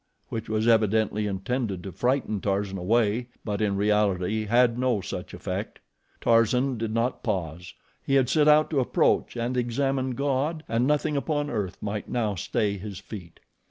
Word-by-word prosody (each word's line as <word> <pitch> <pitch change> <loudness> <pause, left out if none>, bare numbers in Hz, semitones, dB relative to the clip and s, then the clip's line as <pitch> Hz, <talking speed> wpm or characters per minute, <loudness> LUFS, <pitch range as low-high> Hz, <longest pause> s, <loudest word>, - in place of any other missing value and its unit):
which 110 -2 -5
was 110 +1 0
evidently 110 -2 +2
intended 100 -1 -2
to 95 - -6
frighten 125 -5 0
Tarzan 100 0 -1
away; 110 +4 +1 0.2
but 105 0 -2
in 100 -2 +1
reality 105 0 +1
had 120 +2 +3
no 125 -4 +2
such - - -6
effect. - - -5 0.4
Tarzan 120 +2 +2
did 115 -1 -2
not 115 +3 -1
pause. 90 -5 -3 0.3
He 135 - +1
had 130 -2 +4
set 150 +2 +3
out 150 +1 +5
to 145 - +2
approach 125 - +1
and 120 +2 -1
examine 130 +1 0
God 145 +4 -1
and 115 +3 +1
nothing 150 0 +1
upon 145 0 -1
earth 100 -6 -3
might 105 0 -4
now 110 -4 0
stay 100 +2 -1
his 100 -1 -7
feet. 95 -3 -10
115 Hz, 160 wpm, -26 LUFS, 100-130 Hz, 0.4 s, out